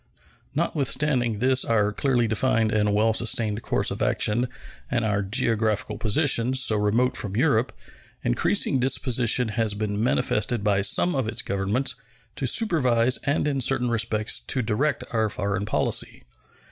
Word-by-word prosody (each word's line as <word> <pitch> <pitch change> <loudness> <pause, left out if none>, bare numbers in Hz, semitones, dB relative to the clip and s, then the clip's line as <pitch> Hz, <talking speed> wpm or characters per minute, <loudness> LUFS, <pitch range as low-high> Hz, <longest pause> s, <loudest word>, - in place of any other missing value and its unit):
Notwithstanding 140 -6 0
this 130 +3 +2
our 105 -2 +1
clearly 120 +1 0
defined 110 0 +1
and 105 -1 +1
well 110 +2 +2
sustained 110 -1 0
course - - -1
of - - -5
action 120 +4 0 0.4
and 120 -2 -1
our 100 -1 0
geographical 110 0 -1
position, 125 +1 +1
so 120 -4 +3
remote 110 +5 +1
from 100 -2 -4
Europe, 120 -2 +1 0.5
increasing 95 - +1
disposition 125 -2 +2
has 110 -1 -1
been 105 0 -2
manifested 110 -2 0
by 100 -2 +1
some 105 - +2
of 130 -5 -1
its 110 - -1
Governments 100 +7 -1 0.4
to 135 - -3
supervise 130 - +2
and 145 +1 0
in 140 -2 -1
certain 125 -1 +1
respects 110 -2 0
to 130 - -2
direct 125 +8 -1
our 110 -2 0
foreign 100 0 -3
policy. - - -1
115 Hz, 145 wpm, -24 LUFS, 105-130 Hz, 0.5 s, so